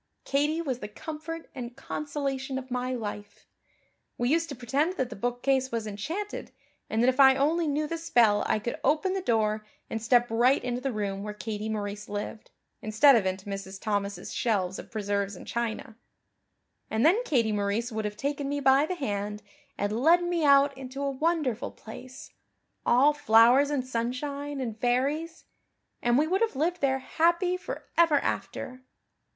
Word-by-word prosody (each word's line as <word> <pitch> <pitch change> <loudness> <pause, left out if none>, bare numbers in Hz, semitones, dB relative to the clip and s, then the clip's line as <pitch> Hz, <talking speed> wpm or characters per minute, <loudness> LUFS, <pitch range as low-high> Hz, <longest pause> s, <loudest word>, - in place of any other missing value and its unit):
Katie 300 +4 +1
was 260 -5 -2
the 210 - -6
comfort 315 +7 -7
and 245 -2 -7
consolation 275 -2 -3
of 260 -1 -7
my 250 +1 -1
life. 205 -3 -7 0.7
We 240 +1 0
used 330 +2 +1
to 280 - -5
pretend 275 +8 0
that 260 -9 -2
the - - -5
bookcase 250 +4 0
was 230 -2 -2
enchanted 315 - -5 0.4
and 225 +2 +1
that - - +4
if 260 +1 +2
I 265 -1 +8
only 315 +5 +1
knew 300 +1 0
the 330 +2 -4
spell 230 -10 +3
I - - +2
could 215 +3 -4
open 310 +7 +2
the 385 - -1
door 215 - +1 0.3
and 225 - -2
step 240 +2 +4
right 245 +4 +3
into 245 0 -2
the 270 0 -1
room 200 -3 -3
where 210 0 -6
Katie 215 0 -4
Maurice 210 -1 -4
lived, 205 +1 -5 0.3
instead 220 +6 +5
of 205 -5 +2
into 190 +1 -3
Mrs. 195 -1 -6
Thomas' 200 -1 -2
shelves 190 -5 0
of - - -10
preserves 200 -2 -2
and - - -11
china. 230 -1 -3 0.9
And 220 +4 +1
then 375 +9 +5
Katie 240 - +1
Maurice 210 +4 -1
would 220 -1 -3
have 210 0 -4
taken 280 +1 -2
me 285 0 -1
by 270 +2 +4
the 365 - -2
hand 210 - -3 0.3
and 210 +3 -1
led 340 +5 +5
me 350 -2 0
out 280 -1 +5
into 265 +1 -6
a 280 - 0
wonderful 290 -4 0
place, 255 +4 -11 0.5
all 270 +5 +5
flowers 250 +1 +5
and 280 -4 -1
sunshine 275 +4 -3
and 225 -4 -4
fairies, 280 +8 0 0.6
and 240 +1 +3
we 300 - +4
would 375 +6 0
have 455 -9 +1
lived 340 +6 0
there 265 -1 +2
happy 340 +6 +1
for 365 - -7
ever 330 -3 +6
after. 255 -1 -4
255 Hz, 175 wpm, -28 LUFS, 220-290 Hz, 0.9 s, I